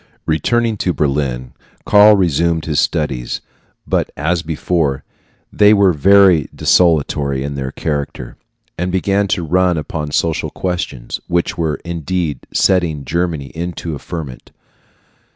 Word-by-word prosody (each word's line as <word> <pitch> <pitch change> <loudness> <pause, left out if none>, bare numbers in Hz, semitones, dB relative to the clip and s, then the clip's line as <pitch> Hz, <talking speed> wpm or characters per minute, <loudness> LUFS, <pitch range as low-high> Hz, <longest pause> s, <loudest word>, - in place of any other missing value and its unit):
Returning 115 +8 0
to 90 -2 -1
Berlin, 70 -5 -2 0.3
Karl 105 +1 +7
resumed 85 -2 +1
his 75 -3 0
studies; 65 -6 -1 0.5
but - - 0
as 80 +3 0
before, 80 -3 -1 0.5
they 105 0 +5
were 100 -3 +4
very 90 0 +5
desultory 70 -5 +2
in 70 +1 -4
their 65 -2 -4
character, 70 -1 -4 0.4
and 90 +1 -1
began 100 +2 +1
to 90 -3 -1
run 90 +1 +2
upon 75 0 -4
social 80 +2 -1
questions, 85 -9 -4
which 85 0 0
were 80 -3 -1
indeed 85 -4 -3
setting 85 -7 +1
Germany 80 -3 -2
into 85 -1 -5
a 70 - -6
ferment. 75 -8 -7
80 Hz, 125 wpm, -17 LUFS, 70-90 Hz, 0.5 s, Karl